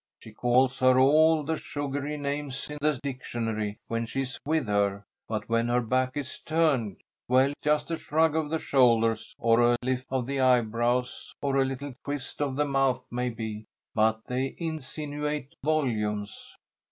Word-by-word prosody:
She 110 - -12
calls 125 +4 +2
her 130 0 +5
all 155 +4 +5
the 160 +3 -1
sugary 145 +1 -4
names 145 -1 -3
in 150 - -6
the 150 -3 +1
dictionary 115 -6 -3
when 115 0 -2
she's 135 +2 -3
with 155 -2 +1
her, 100 -1 0 0.2
but 110 -1 -3
when 115 0 +1
her 120 +1 +2
back 130 +3 0
is 135 -3 -5
turned 150 - +1 0.3
well, 130 +2 +4
it's 145 - -12
just 150 +2 +1
a 165 - 0
shrug 160 +1 +2
of 160 -2 0
the 160 - 0
shoulders 115 -6 +2
or 115 +1 +3
a 120 0 +4
lift 130 0 -1
of 130 -2 -1
the 140 +1 -2
eyebrows 125 0 +1
or 140 -1 0
a 135 - +4
little 135 +1 -5
twist 145 -1 -5
of 140 -2 0
the 150 +1 +1
mouth 135 -2 +1
maybe, 115 -3 -3 0.3
but 110 0 +2
they 130 +2 -2
insinuate 150 -2 -4
volumes. 105 -9 -1
130 Hz, 165 wpm, -27 LUFS, 115-145 Hz, 0.3 s, her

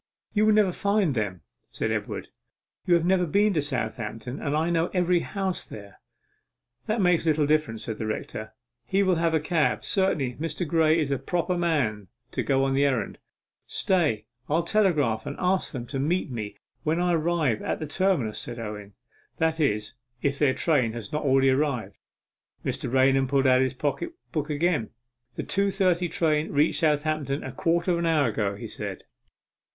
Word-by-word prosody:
'You 215 0 +3
will 215 - +5
never 210 -3 +4
find 200 -4 +1
them,' 100 -6 -2 0.3
said - - -2
Edward. - - -3 0.6
'You 175 - +5
have 170 -1 +1
never 180 -1 +3
been 205 +5 +3
to 155 - +1
Southampton, 125 -2 -4
and 150 0 0
I 165 +2 +1
know 165 0 +2
every 180 -1 +3
house 190 0 -2
there.' 100 -2 -11 0.9
'That 215 0 +1
makes 180 -2 +3
little 155 -1 +3
difference,' 150 -7 0
said 110 -2 -5
the 110 - -2
rector; 110 0 -5 0.3
'he 195 +1 +2
will 185 -3 +2
have 165 0 +2
a - - +3
cab. 155 0 +1
Certainly 155 -10 +1
Mr. 165 +2 -3
Graye 160 0 +3
is 150 -3 0
the 140 -2 0
proper 175 +1 -1
man 140 - 0 0.2
to - - -1
go 135 -1 +2
on 135 0 +1
the 140 +1 +3
errand.' 135 -4 0 0.5
'Stay; 150 - +1 0.2
I'll 160 +3 +2
telegraph 155 - +2
to - - -4
ask 185 +1 +1
them 125 -5 -5
to 135 +2 -4
meet 155 +2 0
me 105 -4 -5 0.2
when 160 +2 0
I 180 0 +2
arrive 160 -7 +1
at - - -2
the 155 - -4
terminus,' 150 - 0
said 120 -1 -5
Owen; 105 -3 -7 0.4
'that 160 0 +1
is, 105 -7 0 0.3
if 140 -1 0
their 140 -3 +3
train 130 -9 +1
has 115 -4 -7
not 150 - 0
already 135 -1 +4
arrived.' 130 -8 -1 0.7
Mr. 120 - -2
Raunham 135 0 +4
pulled 135 +1 +2
out 130 -1 +5
his 130 0 0
pocket 150 - -2 0.2
book 155 -1 -2
again. 150 -5 0 0.5
'The - - -3
two 200 +1 +1
thirty 180 -3 +1
train 155 -1 +1
reached 145 +2 +2
Southampton 150 -2 0
a 130 - -5
quarter 170 +6 +1
of 170 - +1
an 170 - 0
hour 150 -6 +3
ago,' 105 -2 -1
he - - -7
said. - - -6
150 Hz, 185 wpm, -26 LUFS, 130-175 Hz, 0.9 s, will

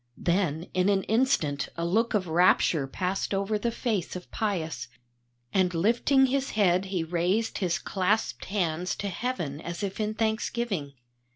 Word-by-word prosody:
Then 170 -3 0
in 185 +2 +2
an 195 -1 +2
instant 220 - +1
a 170 - -1
look 220 +6 +1
of 190 -3 0
rapture 160 -3 +3
passed 185 +6 -2
over 200 +2 0
the 235 - 0
face 225 -7 -2
of 180 - -8
Pius, 165 - -2 0.7
and 185 -2 +2
lifting 235 +9 +4
his 270 +1 0
head 185 -2 +3
he 190 -3 -1
raised 180 +7 0
his 180 -4 +1
clasped 200 +3 -1
hands 180 -3 -1
to 200 - -3
Heaven 175 - -3
as 170 +4 -5
if 195 +1 -3
in 215 0 -1
thanksgiving. 220 -7 -1
190 Hz, 155 wpm, -27 LUFS, 170-220 Hz, 0.7 s, lifting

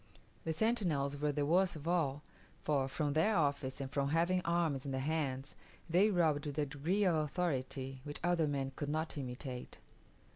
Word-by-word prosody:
The 160 - 0
sentinels 160 -9 +1
were 150 0 +1
the 145 0 0
worst 180 +4 +3
of 155 +1 -7
all; 150 -5 +1 0.4
for, 140 -3 +1
from 145 +1 -1
their 165 +8 +3
office 140 -4 0
and 135 -1 -4
from 140 -1 0
having 170 +4 +2
arms 170 -6 +1
in 140 - -4
their 130 - -1
hands, 135 -2 -1 0.3
they 185 +6 +4
robbed 155 -6 +2
with 145 - -5
a 150 - +2
degree 155 +9 0
of 180 - +4
authority 135 -4 -1
which 145 0 -4
other 175 -3 +2
men 135 -2 -1
could 145 - -3
not 155 +2 -2
imitate. 130 -2 -6
150 Hz, 180 wpm, -35 LUFS, 140-170 Hz, 0.4 s, they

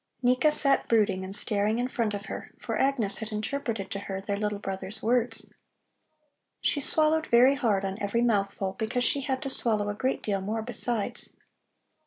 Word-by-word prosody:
Nika 250 +5 +4
sat 280 -2 +3
brooding 205 -4 +2
and 190 +1 -5
staring 210 +1 0
in 245 +1 0
front 225 -4 -1
of 200 +1 -6
her, - - -7
for - - -4
Agnes 255 -7 +1
had 220 -1 -3
interpreted 220 -2 -3
to 200 - -3
her 195 -1 -5
their 200 +1 -3
little 210 0 -2
brother's 195 0 -6
words. 235 0 0 1.1
She 285 - +1
swallowed 315 +2 +3
very 245 +3 +6
hard 220 -8 0
on 195 +2 -4
every 205 +4 0
mouthful, 195 -4 0
because 245 +3 0
she 280 - +2
had 265 -1 -2
to 275 - -3
swallow 215 -5 +1
a - - -1
great 260 +5 -2
deal 200 -2 -1
more 215 +3 -3
besides. 235 -2 -1
220 Hz, 180 wpm, -27 LUFS, 200-250 Hz, 1.1 s, very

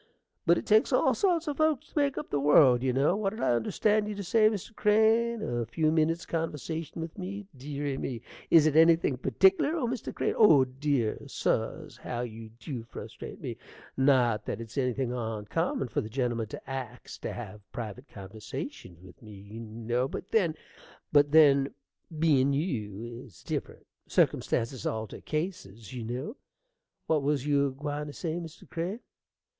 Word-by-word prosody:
But 170 +1 +6
it - - -4
takes 215 +1 +4
all - - +4
sorts 345 -5 +1
o' 295 - 0
folks 310 -2 +1
to - - -1
make 280 -1 +1
up 300 - -5
the 145 - +1
world, 140 -3 +6
you 130 0 +1
know. 140 +8 +2
What 205 -1 0
did - - -8
I - - +2
understand 210 - +1
you 210 - -4
to 200 - -5
say, 215 +3 +4
Mr. 215 +1 -6
Crane? 220 +2 +3
a 120 -1 -1
few 155 +6 +1
minnits' 160 +1 +1
conversation 165 0 -4
with 165 +3 -8
me? 200 +2 -5
Deary 140 +1 -4
me! 120 -4 -4 0.3
Is 160 -2 +7
it 155 -1 +2
anything 165 -3 +5
pertickler, 190 - +3
Mr. 245 0 -3
Crane? - - -1
Oh, 155 -12 +6
dear 130 -3 -1
suz! - - -2
how 120 -1 -4
you 115 -2 -7
dew 115 +3 -7
frustrate 115 - -9
me! - - -5 0.4
Not 130 -5 +3
that - - -3
it's 115 -1 -9
anything 125 -2 0
oncommon 115 - -2
fer 115 - -1
the 110 - -7
gentlemen 120 -2 -1
to - - -9
ax 125 -2 -6
to - - -4
have 105 -3 -8
private 120 +3 -7
conversations 95 -3 -8
with 90 -1 -15
me, 110 -2 -11
you 100 +3 -10
know; 115 +3 -2
but 175 - -7
then 180 -8 +2 0.6
but 145 -1 +5
then 140 -3 +5 0.4
bein' 140 -4 +3
you, 120 - -3
it's 110 -10 -16
different: - - -5 0.2
circumstances 115 0 +1
alter 110 -1 -4
cases, 140 - -5
you 125 -2 -5
know. 125 - -5 0.7
What 155 -2 +2
was 140 -1 0
you 140 -1 +3
a - - -1
gwine 145 +2 -4
to 145 - -7
say, 160 0 -3
Mr. 165 -1 -10
Crane? 180 +7 -4
140 Hz, 170 wpm, -29 LUFS, 120-170 Hz, 0.7 s, Is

